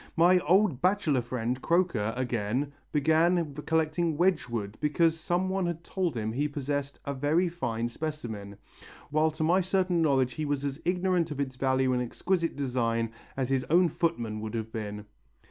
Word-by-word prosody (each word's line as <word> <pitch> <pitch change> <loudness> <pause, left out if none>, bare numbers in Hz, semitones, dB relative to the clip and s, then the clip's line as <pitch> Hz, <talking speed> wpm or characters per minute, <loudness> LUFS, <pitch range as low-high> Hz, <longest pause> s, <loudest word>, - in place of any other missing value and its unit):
My 180 +2 +6
old 180 -3 +3
bachelor 180 -8 +2
friend 120 +1 -3
Croker, 165 - +1
again, 125 +2 -1 0.2
began 160 +1 +2
collecting 160 0 +1
Wedgwood 120 - 0
because 165 +2 +2
some 175 +3 0
one 190 -1 0
had 170 -1 -4
told 175 -7 -2
him 110 0 -2
he 145 +5 0
possessed 145 -1 -3
a 140 - -2
very 150 +6 +2
fine 120 -9 -2
specimen; 120 -8 -5 0.5
while 155 +1 +3
to 155 +1 -4
my 175 +4 +4
certain 185 -2 +1
knowledge 135 -5 +2
he 155 - -3
was 145 -1 -1
as 140 +2 -4
ignorant 180 -1 +1
of 150 -2 -5
its 130 -2 -2
value 130 0 +1
and 125 - +1
exquisite 170 +7 -1
design 115 -4 0 0.3
as 130 -2 -1
his 130 -1 +2
own 175 +2 +4
footman 120 -11 -1
could 110 +1 -5
have 110 -1 -4
been." 105 -2 -5
145 Hz, 165 wpm, -28 LUFS, 125-170 Hz, 0.5 s, My